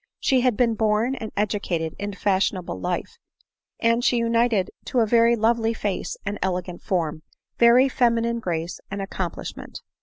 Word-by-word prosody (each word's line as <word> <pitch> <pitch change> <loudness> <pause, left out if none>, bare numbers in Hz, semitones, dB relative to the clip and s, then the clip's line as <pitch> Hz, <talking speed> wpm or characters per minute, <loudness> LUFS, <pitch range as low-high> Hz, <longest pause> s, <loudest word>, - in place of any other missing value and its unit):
She 260 -2 +2
had 245 -4 +2
been 235 -2 +3
born 220 +3 +1
and 225 -5 -6
educated 195 -6 -1
in 205 0 -4
fashionable 190 - 0
life; - - -3 0.6
and 230 +1 +2
she 245 - +3
united 230 -4 +1
to 250 - +1
a - - +4
very 235 +1 +4
lovely 225 0 +1
face 205 -3 -3
and 200 +1 -3
elegant 180 -1 -2
form, 160 -4 -1 0.4
every 240 +3 +6
feminine 235 -2 +1
grace 170 -4 -3
and 200 - -5
accomplish 190 -3 -4
ment. - - -10
215 Hz, 155 wpm, -24 LUFS, 190-235 Hz, 0.6 s, every